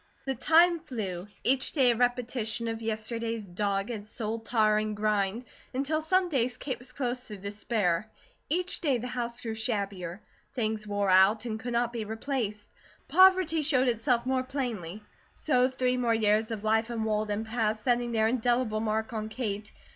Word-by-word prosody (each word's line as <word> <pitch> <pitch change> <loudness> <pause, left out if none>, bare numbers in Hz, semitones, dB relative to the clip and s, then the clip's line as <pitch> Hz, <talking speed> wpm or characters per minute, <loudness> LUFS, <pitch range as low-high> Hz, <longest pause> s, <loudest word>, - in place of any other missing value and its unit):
The 270 - 0
time 335 +6 +4
flew, 210 - -5 0.2
each 265 +1 +2
day 260 -5 +4
a - - 0
repetition 245 -2 0
of 225 0 -3
yesterday's 225 0 -3
dogged, 200 +3 -2
soul 220 +1 -4
tiring 215 -2 +1
grind, 210 +2 0 0.3
until 290 +4 0
some 370 +3 +2
days 255 -6 0
Kate 265 -3 -4
was 245 +1 -11
close 250 -1 -3
to 210 -3 -7
despair. 200 -1 -1 0.4
Each 360 +4 -1
day 285 -7 +2
the 240 - -6
house 240 -1 -3
grew 225 -2 -4
shabbier; 200 -5 -2 0.4
things 220 -3 -2
wore 205 -1 +1
out 195 +4 +5
and 220 -2 -3
could 245 +1 -4
not 235 0 +1
be 230 -2 -3
replaced; 220 -1 -3 0.4
poverty 370 -4 +5
showed 270 -3 +3
itself 235 +1 +1
more 260 0 +1
plainly. 230 - -4 0.3
So 255 -4 +2
three 255 -1 0
more 235 -2 +2
years 215 0 +2
of 220 -2 -5
life 220 +1 +2
in 230 -2 -2
Walden 215 0 -1
passed, 220 -1 -1
setting 240 -1 +1
their 220 -1 +2
indelible 240 -2 +1
mark 220 +2 -1
on 215 -1 -3
Kate. 215 -3 -4
230 Hz, 165 wpm, -29 LUFS, 215-255 Hz, 0.4 s, out